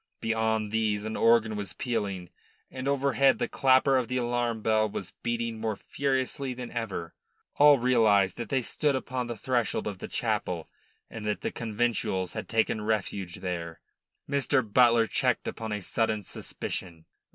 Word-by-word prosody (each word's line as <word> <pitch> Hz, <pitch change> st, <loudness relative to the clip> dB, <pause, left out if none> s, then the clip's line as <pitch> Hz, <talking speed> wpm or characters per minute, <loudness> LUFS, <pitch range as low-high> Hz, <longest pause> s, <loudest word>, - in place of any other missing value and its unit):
Beyond 110 Hz, -1 st, 0 dB
these 110 Hz, -2 st, 0 dB
an 110 Hz, -, -3 dB
organ 115 Hz, -2 st, +4 dB
was 100 Hz, -3 st, -4 dB
pealing, 100 Hz, -8 st, -3 dB, 0.4 s
and 130 Hz, +1 st, -5 dB
overhead 140 Hz, -1 st, +3 dB
the -, -, -1 dB
clapper 135 Hz, 0 st, +4 dB
of 125 Hz, -2 st, 0 dB
the 125 Hz, -, -1 dB
alarm 120 Hz, -2 st, -1 dB
bell 110 Hz, -1 st, +2 dB
was 95 Hz, -2 st, -5 dB
beating 115 Hz, -1 st, -2 dB
more 110 Hz, -1 st, -1 dB
furiously 135 Hz, +1 st, -2 dB
than 125 Hz, -1 st, -7 dB
ever. 105 Hz, -8 st, -4 dB, 0.4 s
All 145 Hz, 0 st, +8 dB
realised 110 Hz, -7 st, +3 dB
that 120 Hz, -, -5 dB
they 130 Hz, -3 st, +1 dB
stood 145 Hz, +3 st, 0 dB
upon 130 Hz, -1 st, -3 dB
the 120 Hz, -1 st, -5 dB
threshold 120 Hz, -1 st, 0 dB
of 100 Hz, -3 st, -4 dB
the -, -, -6 dB
chapel -, -, -2 dB, 0.4 s
and 110 Hz, -, -7 dB
that 105 Hz, -, -1 dB
the -, -, -2 dB
conventuals 110 Hz, -5 st, -1 dB
had -, -, -6 dB
taken 110 Hz, -1 st, +1 dB
refuge 100 Hz, -4 st, -2 dB
there. 85 Hz, -3 st, -4 dB, 0.5 s
Mr. 140 Hz, -1 st, +2 dB
Butler 115 Hz, +1 st, +5 dB
checked -, -, 0 dB
upon 110 Hz, -1 st, -4 dB
a 105 Hz, -2 st, -3 dB
sudden 110 Hz, +1 st, 0 dB
suspicion. 85 Hz, -2 st, -6 dB
115 Hz, 160 wpm, -28 LUFS, 105-125 Hz, 0.5 s, All